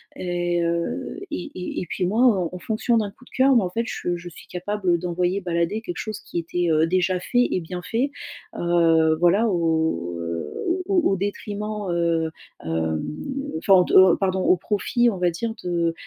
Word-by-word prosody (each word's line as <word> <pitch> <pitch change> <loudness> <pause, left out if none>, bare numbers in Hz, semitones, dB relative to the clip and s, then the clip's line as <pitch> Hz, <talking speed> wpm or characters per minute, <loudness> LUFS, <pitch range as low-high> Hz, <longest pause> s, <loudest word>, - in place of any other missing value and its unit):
et 175 -1 -1
heu 170 - -2
et 300 0 -5
et 180 - -4
et - - -4
puis 180 - -2
moi, 215 +6 +1 0.2
heu, - - -3
en - - -6
fonction 220 +4 0
d'un 210 -3 -1
coup 250 - -20
de - - -19
cœur 265 +1 +4
moi 225 -6 +4
en - - -2
fait 230 +6 -2
je 175 - -2
je 175 0 -9
suis 170 - -14
capable 185 0 -1
d'envoyer 180 +2 0
balader 175 +4 -1
quelque 175 -6 -6
chose 215 -1 -4
qui - - -5
était 175 +1 -1
heu, 155 0 +4
déjà 185 +1 +1
fait 245 +7 +2
et - - +1
bien 180 +2 -6
fait, 245 +8 -1 0.5
heu, 165 -2 +3
voilà, 185 +7 +4
au 160 - 0
heu, 85 -2 -4
au 365 +2 0
au 350 - +3
au - - +2
détriment, 205 +1 -4
heu, 165 -2 +1 0.3
hem 80 -1 -1 0.6
enfin 195 +4 +3
au 185 -1 +7
de - - -4
au 185 -2 +8
pardon, 190 -1 0
au 185 - +4
profit, 230 +6 +1
on 205 - -3
va 180 -1 +2
dire 225 +7 -3
de, 170 -2 0
180 Hz, 200 wpm, -23 LUFS, 170-210 Hz, 0.6 s, au